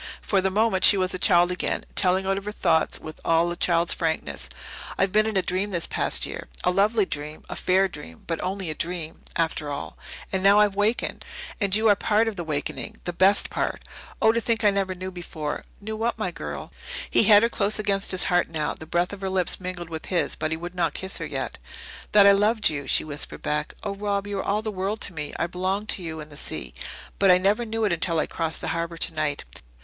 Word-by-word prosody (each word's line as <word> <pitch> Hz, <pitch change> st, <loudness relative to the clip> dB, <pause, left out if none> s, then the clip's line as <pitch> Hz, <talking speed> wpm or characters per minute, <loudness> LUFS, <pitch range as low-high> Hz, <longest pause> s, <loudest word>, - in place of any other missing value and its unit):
For 195 Hz, -2 st, +2 dB
the 190 Hz, -, +1 dB
moment 205 Hz, -1 st, +1 dB
she 200 Hz, -, +8 dB
was 185 Hz, 0 st, +1 dB
a 185 Hz, -, -1 dB
child 175 Hz, 0 st, +5 dB
again, 180 Hz, -, -2 dB
telling 190 Hz, +1 st, +3 dB
out 195 Hz, +1 st, -1 dB
her 210 Hz, -, -4 dB
thoughts 165 Hz, -6 st, +1 dB
with 155 Hz, -, -10 dB
all 165 Hz, +1 st, +2 dB
a -, -, -3 dB
child's 170 Hz, -1 st, +2 dB
frankness. 160 Hz, -, -2 dB, 0.5 s
"I've 190 Hz, -1 st, +2 dB
been 215 Hz, +2 st, +3 dB
in 215 Hz, -3 st, -1 dB
a 190 Hz, -, +2 dB
dream 185 Hz, +4 st, 0 dB
this 170 Hz, -4 st, -1 dB
past -, -, +1 dB
year -, -, -7 dB, 0.2 s
a 180 Hz, -, +3 dB
lovely 205 Hz, +3 st, +3 dB
dream 150 Hz, -2 st, -6 dB
a -, -, -6 dB
fair 190 Hz, +1 st, +3 dB
dream, 115 Hz, -, -10 dB
but 165 Hz, -1 st, -3 dB
only 190 Hz, -2 st, -3 dB
a -, -, -3 dB
dream, 165 Hz, 0 st, -4 dB
after 160 Hz, -2 st, -1 dB
all. 140 Hz, 0 st, -5 dB, 0.4 s
And 190 Hz, -, +1 dB
now 200 Hz, +2 st, +6 dB
I've 210 Hz, -1 st, +4 dB
wakened. 205 Hz, +4 st, 0 dB, 0.4 s
And 200 Hz, -3 st, +3 dB
you 220 Hz, +1 st, +3 dB
are 205 Hz, -, +6 dB
part 215 Hz, +3 st, +2 dB
of 225 Hz, -, -2 dB
the 175 Hz, -, -4 dB
wakening 150 Hz, -3 st, -3 dB
the 175 Hz, -, -3 dB
best 190 Hz, +3 st, +3 dB
part! -, -, -2 dB, 0.4 s
Oh, 220 Hz, -, +5 dB
to 230 Hz, +1 st, 0 dB
think 230 Hz, 0 st, 0 dB
I 205 Hz, -, +5 dB
never 195 Hz, -1 st, -1 dB
knew 185 Hz, +1 st, -6 dB
before!" 160 Hz, -4 st, -5 dB
"Knew 220 Hz, +1 st, -5 dB
what, 230 Hz, +2 st, -1 dB
my -, -, -2 dB
girl?" -, -, -7 dB, 0.4 s
He -, -, +4 dB
had 205 Hz, +1 st, +7 dB
her -, -, +5 dB
close 210 Hz, -2 st, +1 dB
against 200 Hz, -2 st, +1 dB
his 185 Hz, -, +2 dB
heart 175 Hz, -2 st, +2 dB
now; 155 Hz, -2 st, -2 dB
the 155 Hz, -, -11 dB
breath 175 Hz, +3 st, 0 dB
of 200 Hz, -, -8 dB
her 190 Hz, -, -2 dB
lips 185 Hz, -2 st, 0 dB
mingled 180 Hz, -2 st, -6 dB
with 160 Hz, -1 st, -6 dB
his, 180 Hz, -3 st, 0 dB
but 155 Hz, -, -2 dB
he 160 Hz, -, -2 dB
would 175 Hz, +2 st, -7 dB
not 180 Hz, -1 st, -1 dB
kiss 190 Hz, 0 st, 0 dB
her -, -, -4 dB
yet. -, -, -4 dB, 0.5 s
"That 205 Hz, -1 st, +8 dB
I 200 Hz, -, +9 dB
loved 210 Hz, 0 st, +3 dB
you," 140 Hz, -2 st, -5 dB
she -, -, +3 dB
whispered 150 Hz, -1 st, -5 dB
back. 150 Hz, 0 st, -2 dB
"Oh, 200 Hz, -, -2 dB
Rob, 200 Hz, 0 st, -2 dB
you 205 Hz, -1 st, -3 dB
are -, -, -2 dB
all 210 Hz, +2 st, 0 dB
the 215 Hz, -, -2 dB
world 200 Hz, +2 st, -2 dB
to 185 Hz, -, -1 dB
me. 150 Hz, -2 st, -5 dB
I -, -, 0 dB
belong 185 Hz, +4 st, -2 dB
to 205 Hz, -, +1 dB
you 160 Hz, -2 st, -5 dB
and 150 Hz, 0 st, -9 dB
the 145 Hz, -, -8 dB
sea. 60 Hz, -, -4 dB, 0.5 s
But 195 Hz, -, +5 dB
I 180 Hz, -, +8 dB
never 205 Hz, +6 st, +1 dB
knew 225 Hz, 0 st, -2 dB
it 205 Hz, -, +1 dB
until 170 Hz, 0 st, +1 dB
I 155 Hz, -, +2 dB
crossed 165 Hz, -1 st, -3 dB
the -, -, -2 dB
harbour 170 Hz, 0 st, -3 dB
tonight. 155 Hz, -3 st, -1 dB
185 Hz, 240 wpm, -25 LUFS, 165-205 Hz, 0.5 s, I